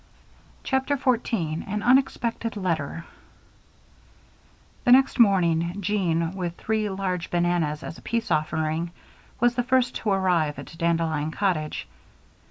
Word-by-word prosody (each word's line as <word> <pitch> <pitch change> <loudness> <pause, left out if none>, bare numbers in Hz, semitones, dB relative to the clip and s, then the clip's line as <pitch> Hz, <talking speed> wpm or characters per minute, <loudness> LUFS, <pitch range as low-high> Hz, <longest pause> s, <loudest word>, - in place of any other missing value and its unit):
CHAPTER 265 +1 0
14 225 - 0
An 210 +1 -3
Unexpected 240 -3 +1
Letter 165 -4 -2 1.8
The 245 - +3
next 265 +1 +5
morning, 175 -4 +3
Jean, 175 -4 0
with 180 -3 -4
three 215 -1 -1
large 190 -3 -3
bananas 170 -3 0
as 160 - -7
a - - -16
peace 230 0 -2
offering, 155 +2 0 0.5
was 240 +1 +3
the 245 - 0
first 255 0 +2
to 215 - -3
arrive 180 -6 +1
at - - -9
Dandelion 165 -3 0
Cottage. 160 -4 -1
185 Hz, 120 wpm, -25 LUFS, 165-230 Hz, 1.8 s, next